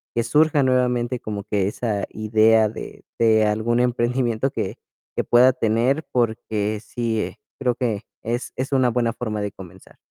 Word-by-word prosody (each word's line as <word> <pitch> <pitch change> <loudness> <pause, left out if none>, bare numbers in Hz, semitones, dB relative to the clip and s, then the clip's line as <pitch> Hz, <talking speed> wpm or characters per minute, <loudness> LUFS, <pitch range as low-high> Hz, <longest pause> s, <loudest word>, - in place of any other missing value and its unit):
que 115 - +1
surja 150 +3 +3
nuevamente 125 -1 +1
como 105 -2 -5
que 100 -3 0
esa 105 -2 -2
idea 110 +1 +3
de 110 - -9
de 110 -1 +4
algún 110 +3 +1
emprendimiento 125 0 0
que - - -4 0.4
que - - 0
pueda 125 +2 +5
tener, 125 +5 +1
porque 110 -3 -1
sí, 115 -2 -2
eh, - - -6 0.2
creo 125 -2 +1
que 115 -5 -2 0.2
es 120 +2 -3
es 135 +2 -3
una 130 -2 +3
buena 120 -1 0
forma 110 -2 -4
de 105 -1 -3
comenzar. 95 -2 -14
115 Hz, 160 wpm, -22 LUFS, 110-125 Hz, 0.4 s, pueda